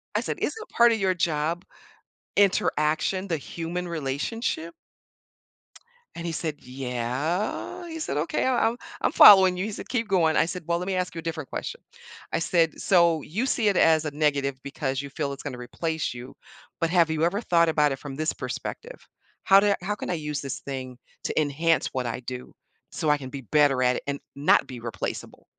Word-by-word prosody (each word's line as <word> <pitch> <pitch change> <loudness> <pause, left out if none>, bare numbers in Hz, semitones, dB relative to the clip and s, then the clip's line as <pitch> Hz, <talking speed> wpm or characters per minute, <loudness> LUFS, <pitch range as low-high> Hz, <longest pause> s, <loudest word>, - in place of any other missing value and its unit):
I - - +2
said, - - -3
"...isn't 440 0 -3
part 235 0 +5
of 220 - -1
your 190 -1 +2
job 165 0 -1 0.7
interaction, 185 -1 +2
the 165 - 0
human 170 +4 -5
relationship?" 170 - -3 1.4
And 170 - -6
he 170 - -2
said, 155 -1 -3
"Yeah," 130 - -3
he 325 -1 -6
said, 145 - -3
"Okay, 155 - 0
I'm 250 -3 +2
I'm - - -11 0.2
I'm - - +2
following 190 -3 +9
you." 185 - -1
He 215 - -4
said, - - -7
"Keep 230 -3 -1
going." 170 -5 +3
I - - +4
said, 180 +1 -5
"Well, 170 0 +1
let 180 - -5
me 190 - 0
ask 180 0 -2
you 165 - -6
a - - -5
different 160 -3 -5
question." - - -5 0.5
I - - +1
said, 165 -1 +1
"So 170 -4 +4
you 205 - -2
see 230 -5 +1
it 200 - +3
as 160 -1 +4
a 150 - -2
negative 140 -2 0
because 135 -1 -3
you 140 - -8
feel 140 -1 -2
it's 140 - -10
gonna 140 -4 -5
replace 160 +5 -3
you, 120 +1 -10 0.4
but 165 - +1
have 170 -2 +4
you 160 0 0
ever 195 +6 +1
thought 170 -5 +3
about 150 -2 +3
it 135 - -4
from 140 -2 -7
this 155 +2 -1
perspective? - - -7 0.4
How 195 -1 +7
do 205 0 +3
how 205 +3 -2
can - - -6
I - - 0
use 150 -3 -3
this 135 -2 -5
thing 130 -2 -6 0.3
to - - 0
enhance 155 +3 +1
what 130 -2 -2
I 115 - -3
do, 125 +1 -7 0.4
so 155 - -1
I 150 - +4
can 130 -2 -8
be 135 +1 -7
better 145 -4 +4
at 125 0 +3
it - - -6
and 140 0 -2 0.2
not 140 +2 +4
be 125 -2 -8
replaceable?" 115 -4 -6
160 Hz, 205 wpm, -26 LUFS, 140-185 Hz, 1.4 s, following